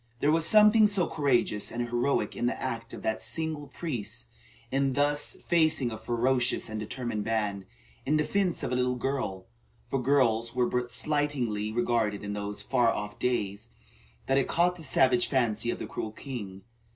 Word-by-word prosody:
There 145 Hz, -, +3 dB
was 160 Hz, 0 st, +3 dB
something 215 Hz, 0 st, +7 dB
so 200 Hz, -4 st, +3 dB
courageous 135 Hz, -10 st, 0 dB
and 120 Hz, +1 st, -3 dB
heroic 120 Hz, +4 st, 0 dB
in 120 Hz, -, -1 dB
the 125 Hz, -, -2 dB
act 115 Hz, -3 st, -4 dB
of -, -, -8 dB
that 110 Hz, 0 st, -1 dB
single 160 Hz, -3 st, -1 dB
priest 125 Hz, -6 st, -5 dB, 0.5 s
in 135 Hz, 0 st, +1 dB
thus 145 Hz, +2 st, +2 dB
facing 160 Hz, -7 st, +2 dB
a 110 Hz, -, -5 dB
ferocious 120 Hz, +2 st, 0 dB
and 110 Hz, 0 st, -4 dB
determined 110 Hz, -1 st, -4 dB
band, 105 Hz, -4 st, -2 dB, 0.4 s
in 150 Hz, +3 st, +1 dB
defence 180 Hz, +4 st, 0 dB
of -, -, -2 dB
a -, -, +1 dB
little 125 Hz, 0 st, +1 dB
girl, 125 Hz, -8 st, -3 dB, 0.5 s
for 135 Hz, -, 0 dB
girls 120 Hz, -3 st, +2 dB
were 125 Hz, -1 st, +3 dB
but 125 Hz, 0 st, -2 dB
slightingly 130 Hz, -9 st, 0 dB
regarded 115 Hz, -3 st, 0 dB
in 105 Hz, 0 st, -4 dB
those 105 Hz, 0 st, -5 dB
far 120 Hz, +1 st, +2 dB
off 105 Hz, -1 st, -5 dB
days, 105 Hz, -5 st, -2 dB, 0.6 s
that 135 Hz, +1 st, +2 dB
it 135 Hz, -, 0 dB
caught 180 Hz, +1 st, +2 dB
the 175 Hz, -, -11 dB
savage 130 Hz, -4 st, +3 dB
fancy 120 Hz, -4 st, 0 dB
of -, -, -1 dB
the -, -, -5 dB
cruel 110 Hz, -, -5 dB
king. 105 Hz, -7 st, -7 dB
125 Hz, 175 wpm, -28 LUFS, 110-145 Hz, 0.6 s, something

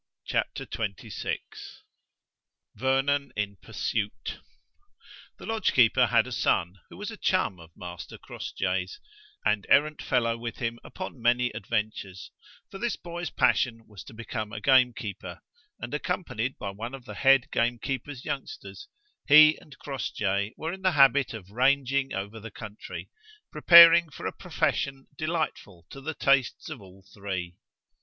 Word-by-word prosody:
CHAPTER -, -, -2 dB
XXVI 105 Hz, -4 st, -4 dB, 1.4 s
VERNON 135 Hz, +4 st, 0 dB
IN 105 Hz, -1 st, -3 dB
PURSUIT 105 Hz, +5 st, -4 dB, 1.0 s
The -, -, -11 dB
lodge 225 Hz, -1 st, 0 dB
keeper 120 Hz, -4 st, +5 dB
had -, -, +3 dB
a -, -, -8 dB
son, 90 Hz, +3 st, 0 dB
who -, -, -12 dB
was 205 Hz, +3 st, -5 dB
a 225 Hz, -, -9 dB
chum 185 Hz, -, 0 dB
of 80 Hz, -1 st, -13 dB
Master 90 Hz, 0 st, -8 dB
Crossjay's, 90 Hz, -1 st, -4 dB, 0.5 s
and 105 Hz, -2 st, +1 dB
errant 150 Hz, +1 st, +4 dB
fellow 115 Hz, -2 st, 0 dB
with 115 Hz, -1 st, -5 dB
him 120 Hz, -2 st, -3 dB
upon 185 Hz, -9 st, -8 dB
many 120 Hz, +1 st, +2 dB
adventures; 105 Hz, -3 st, -4 dB, 0.4 s
for 195 Hz, -, -8 dB
this 240 Hz, +1 st, -1 dB
boy's 175 Hz, -1 st, -6 dB
passion 115 Hz, -3 st, +1 dB
was 105 Hz, -3 st, -12 dB
to 130 Hz, -, -12 dB
become 110 Hz, -2 st, -5 dB
a 115 Hz, -, -5 dB
gamekeeper, 125 Hz, -4 st, +1 dB, 0.4 s
and 120 Hz, +4 st, -6 dB
accompanied 140 Hz, -, -2 dB
by 100 Hz, -, -5 dB
one 115 Hz, +6 st, -6 dB
of 130 Hz, -3 st, -13 dB
the -, -, -8 dB
head 135 Hz, -2 st, +4 dB
gamekeeper's 125 Hz, +3 st, -2 dB
youngsters, 410 Hz, -, -6 dB, 0.4 s
he 155 Hz, +1 st, +8 dB
and 145 Hz, -2 st, -16 dB
Crossjay 105 Hz, -6 st, -2 dB
were 160 Hz, +2 st, -4 dB
in 190 Hz, -, -8 dB
the 185 Hz, -1 st, +2 dB
habit 140 Hz, -1 st, +5 dB
of 100 Hz, -3 st, -10 dB
rangeing 135 Hz, +2 st, +2 dB
over 100 Hz, +3 st, -5 dB
the 115 Hz, +1 st, -8 dB
country, 105 Hz, 0 st, -9 dB, 0.4 s
preparing 170 Hz, -1 st, +8 dB
for -, -, -9 dB
a -, -, -2 dB
profession 135 Hz, -1 st, -2 dB
delightful 155 Hz, -, -3 dB
to 135 Hz, -, -9 dB
the 160 Hz, +3 st, -4 dB
tastes 135 Hz, -3 st, +1 dB
of 120 Hz, -, -7 dB
all 95 Hz, 0 st, -16 dB
three. 95 Hz, -4 st, -5 dB
125 Hz, 145 wpm, -27 LUFS, 105-140 Hz, 1.4 s, he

